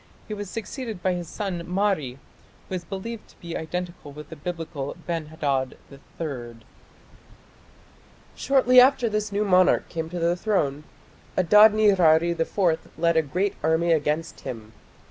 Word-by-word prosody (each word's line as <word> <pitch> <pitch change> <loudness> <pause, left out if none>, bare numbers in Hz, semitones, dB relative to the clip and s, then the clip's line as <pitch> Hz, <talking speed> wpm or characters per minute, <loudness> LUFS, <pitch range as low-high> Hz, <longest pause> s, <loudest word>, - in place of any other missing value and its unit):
He 215 - -5
was 205 -2 -6
succeeded 225 -2 -6
by 185 - +2
his 175 -1 -4
son 195 -5 -4
Mari, 180 -9 0 0.5
who - - -8
is 180 -1 -3
believed 210 +5 -7
to - - -23
be 170 -1 -7
identical 175 -1 -5
with 150 0 -11
the 160 - -8
Biblical 155 -3 -5
Ben 165 -3 -3
Hadad 140 -4 -2 0.4
III. 125 -8 -5 1.8
Shortly 255 -2 +5
after 255 -2 +4
this 215 0 -2
new 205 +1 0
monarch 185 -2 +4
came 160 -1 -4
to 180 - -5
the 170 +1 +2
throne, 155 -8 -1 0.5
Adad 210 +4 +7
nirari 175 -6 +4
IV 170 0 -1
led 170 +1 +2
a 160 - +5
great 180 +7 -1
army 160 +2 +2
against 155 +1 0
him. 110 -2 -8
175 Hz, 145 wpm, -25 LUFS, 155-205 Hz, 1.8 s, Adad